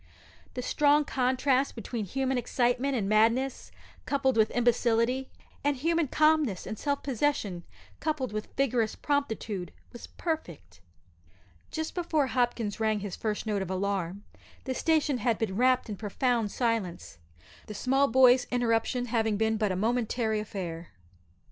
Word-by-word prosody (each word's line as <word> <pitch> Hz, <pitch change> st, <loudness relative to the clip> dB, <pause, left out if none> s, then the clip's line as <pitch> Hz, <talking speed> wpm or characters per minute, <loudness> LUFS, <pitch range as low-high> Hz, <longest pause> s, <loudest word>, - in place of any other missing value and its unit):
The 250 Hz, -, -3 dB
strong 295 Hz, +2 st, +3 dB
contrast 260 Hz, +1 st, +1 dB
between 225 Hz, -1 st, -4 dB
human 265 Hz, +6 st, -1 dB
excitement 245 Hz, +2 st, 0 dB
and 210 Hz, -5 st, -1 dB
madness 230 Hz, +6 st, +2 dB, 0.4 s
coupled 275 Hz, -2 st, +1 dB
with 220 Hz, -1 st, +4 dB
imbecility, 240 Hz, +1 st, +1 dB, 0.3 s
and 285 Hz, -1 st, +1 dB
human 330 Hz, +3 st, +1 dB
calmness 305 Hz, -, +2 dB
and 215 Hz, -, -4 dB
self 285 Hz, +5 st, -2 dB
possession 235 Hz, -9 st, -1 dB, 0.4 s
coupled 285 Hz, -7 st, -2 dB
with 215 Hz, 0 st, -3 dB
vigorous 245 Hz, -5 st, +1 dB
promptitude, 220 Hz, -, -2 dB, 0.2 s
was 240 Hz, -, -9 dB
perfect. 245 Hz, -, -5 dB, 0.9 s
Just 315 Hz, 0 st, -4 dB
before 335 Hz, -4 st, 0 dB
poor 275 Hz, -, +1 dB
Hopkins 240 Hz, -4 st, 0 dB
rang 215 Hz, -2 st, +1 dB
his 200 Hz, -2 st, -5 dB
first 215 Hz, -1 st, -3 dB
note 210 Hz, -2 st, -1 dB
of 190 Hz, -, -4 dB
alarm 195 Hz, 0 st, -2 dB, 0.4 s
the 260 Hz, -, -2 dB
station 300 Hz, -2 st, +1 dB
had 230 Hz, -1 st, +1 dB
been 210 Hz, -4 st, -2 dB
wrapt 255 Hz, +3 st, +3 dB
in 210 Hz, -2 st, -5 dB
profound 225 Hz, +1 st, 0 dB
silence 220 Hz, -, -2 dB, 0.5 s
the 210 Hz, -, -7 dB
small 270 Hz, +6 st, +2 dB
boy's 250 Hz, 0 st, +5 dB
interruption 245 Hz, 0 st, +1 dB
having 225 Hz, -3 st, 0 dB
been 220 Hz, +1 st, +1 dB
but 210 Hz, -2 st, 0 dB
a -, -, -1 dB
momentary 225 Hz, +1 st, 0 dB
affair. 175 Hz, -5 st, -5 dB
240 Hz, 140 wpm, -28 LUFS, 215-265 Hz, 0.9 s, boy's